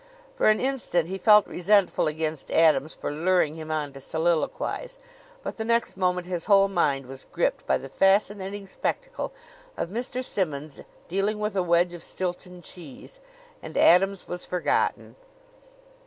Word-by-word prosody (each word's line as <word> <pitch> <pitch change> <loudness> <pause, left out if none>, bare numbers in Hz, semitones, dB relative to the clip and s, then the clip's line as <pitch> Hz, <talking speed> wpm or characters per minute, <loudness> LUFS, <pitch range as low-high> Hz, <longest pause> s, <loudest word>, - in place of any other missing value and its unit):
For - - +1
an 215 0 +4
instant 255 -11 0
he 190 +1 -4
felt 210 -1 +6
resentful 195 0 +2
against 155 -1 -3
Adams 155 -2 +3
for - - -4
luring 165 0 +1
him 155 -1 -8
on 150 -3 -2
to 135 - -10
soliloquize; 170 - -1 0.5
but - - -5
the 220 - -2
next 235 +1 0
moment 180 -1 0
his 175 -2 -4
whole 195 -2 +5
mind 140 -8 +1
was 135 +1 -11
gripped - - -1
by - - +3
the 135 - -9
fascinating 195 +4 +1
spectacle - - -4 0.5
of - - -3
Mr. 250 +3 -3
Simmonds 155 - -3 0.3
dealing 195 +4 0
with 210 0 -3
a 190 - +2
wedge 175 0 +2
of 175 - -8
Stilton 180 -1 -5
cheese, 175 - -11 0.4
and - - -7
Adams 195 +2 +4
was 180 0 -5
forgotten. 180 -1 -1
180 Hz, 155 wpm, -26 LUFS, 160-205 Hz, 0.5 s, felt